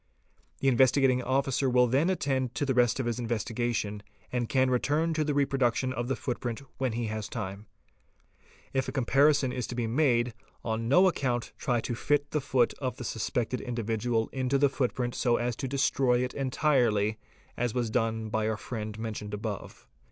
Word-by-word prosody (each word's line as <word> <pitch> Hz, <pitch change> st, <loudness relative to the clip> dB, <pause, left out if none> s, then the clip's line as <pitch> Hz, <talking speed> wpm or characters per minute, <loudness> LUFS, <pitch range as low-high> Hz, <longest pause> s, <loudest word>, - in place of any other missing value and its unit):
The 135 Hz, -, +1 dB
Investigating 130 Hz, 0 st, +4 dB
Officer 135 Hz, +1 st, +1 dB
will 125 Hz, 0 st, +5 dB
then 135 Hz, +8 st, +2 dB
attend 135 Hz, -8 st, -1 dB
to 145 Hz, -, 0 dB
the 135 Hz, -, +1 dB
rest 120 Hz, 0 st, +3 dB
of 130 Hz, -, -1 dB
his 120 Hz, 0 st, -2 dB
investigation 115 Hz, -2 st, -2 dB, 0.3 s
and 120 Hz, -2 st, -1 dB
can 130 Hz, -1 st, +3 dB
return 150 Hz, +6 st, +1 dB
to 155 Hz, -1 st, +1 dB
the 150 Hz, -1 st, -1 dB
reproduction 130 Hz, -2 st, +1 dB
of 120 Hz, -1 st, -3 dB
the 135 Hz, -, 0 dB
footprint 120 Hz, 0 st, -4 dB, 0.2 s
when 130 Hz, -3 st, 0 dB
he 120 Hz, +1 st, -2 dB
has 110 Hz, -1 st, -4 dB
time. 100 Hz, -2 st, -5 dB, 1.1 s
If 130 Hz, -1 st, 0 dB
a -, -, -2 dB
comparison 135 Hz, +1 st, +3 dB
is 125 Hz, -2 st, -3 dB
to 120 Hz, -, -5 dB
be 120 Hz, -1 st, -1 dB
made, 120 Hz, -1 st, +2 dB, 0.3 s
on 115 Hz, 0 st, -1 dB
no 180 Hz, +7 st, +6 dB
account 125 Hz, -8 st, -1 dB
try 120 Hz, -3 st, 0 dB
to 120 Hz, -, -3 dB
fit 145 Hz, +4 st, 0 dB
the 150 Hz, -, 0 dB
foot 125 Hz, -2 st, +2 dB
of 130 Hz, -3 st, -3 dB
the -, -, -6 dB
suspected 120 Hz, +2 st, -2 dB
individual 115 Hz, -1 st, -1 dB
into 130 Hz, +1 st, +1 dB
the 140 Hz, 0 st, +4 dB
footprint 125 Hz, -2 st, -1 dB
so 120 Hz, -2 st, +2 dB
as 120 Hz, 0 st, -1 dB
to 135 Hz, -, -3 dB
destroy 130 Hz, -2 st, +2 dB
it 125 Hz, -, -3 dB
entirely, 120 Hz, -6 st, +1 dB, 0.4 s
as 120 Hz, -1 st, -1 dB
was 120 Hz, -3 st, 0 dB
done 110 Hz, -1 st, 0 dB
by 110 Hz, 0 st, 0 dB
our 110 Hz, -, -1 dB
friend 110 Hz, -2 st, -5 dB
mentioned 105 Hz, -2 st, -5 dB
above. 105 Hz, -2 st, -6 dB
125 Hz, 180 wpm, -29 LUFS, 115-135 Hz, 1.1 s, no